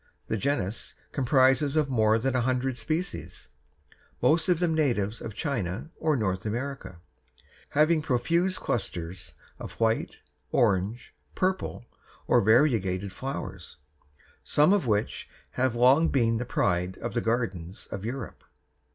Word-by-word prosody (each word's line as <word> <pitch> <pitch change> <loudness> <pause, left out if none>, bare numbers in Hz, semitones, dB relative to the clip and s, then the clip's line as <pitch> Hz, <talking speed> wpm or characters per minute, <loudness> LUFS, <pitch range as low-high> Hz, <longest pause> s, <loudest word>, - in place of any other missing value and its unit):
The - - 0
genus 110 -3 -2 0.2
comprises 135 +2 +3
more 110 -4 +3
than 130 +3 -1
a 125 - +2
hundred 130 +1 0
species, 165 +8 -4 0.7
most 160 +8 +3
of 180 - +4
them 170 -1 +1
natives 115 -9 0
of 110 -3 -7
China 125 - -3
or 155 -2 +1
North 95 -5 -1
America, 120 -3 -4 0.8
having 155 +1 +4
profuse 170 +7 +1
clusters 90 -5 -4 0.2
of - - -7
white, 115 0 0 0.3
orange, 110 0 +1 0.2
purple, 185 -9 -1 0.4
or - - +4
variegated 100 -5 +2
flowers, 95 - -6 0.7
some 150 +6 +4
of 195 -11 +1
which 105 -1 -1 0.2
have 130 -2 0
long 130 +7 +5
been 115 -4 +2
the 125 - -3
pride 90 -5 0
of 120 - -5
the 120 - 0
gardens 100 -6 -2
of 95 - -5
Europe. 120 +3 -6
120 Hz, 125 wpm, -27 LUFS, 105-145 Hz, 0.8 s, long